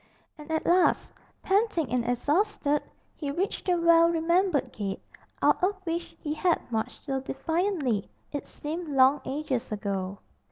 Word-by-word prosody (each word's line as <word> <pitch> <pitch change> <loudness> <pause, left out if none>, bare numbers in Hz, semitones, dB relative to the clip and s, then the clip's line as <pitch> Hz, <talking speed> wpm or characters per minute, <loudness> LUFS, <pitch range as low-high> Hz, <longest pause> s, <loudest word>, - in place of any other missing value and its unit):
And 300 0 -12
at 315 0 -1
last, 355 +1 +3 0.3
panting 390 - +1
and 250 -1 +1
exhausted, 290 - +1 0.3
he 290 - -4
reached 360 +9 -2
the 360 - +4
well 335 0 +6
remembered 340 -1 +1
gate, 195 -2 -3 0.4
out - - +4
of 395 +2 +3
which 335 +1 -3
he 300 - -3
had 340 +2 +2
marched 220 -1 -3
so 270 -2 -1
defiantly, 310 - -1 0.2
it 290 - -5
seemed 325 +3 -5
long 270 0 +4
ages 265 -4 -2
ago. 200 -2 -3
305 Hz, 145 wpm, -28 LUFS, 260-345 Hz, 0.4 s, well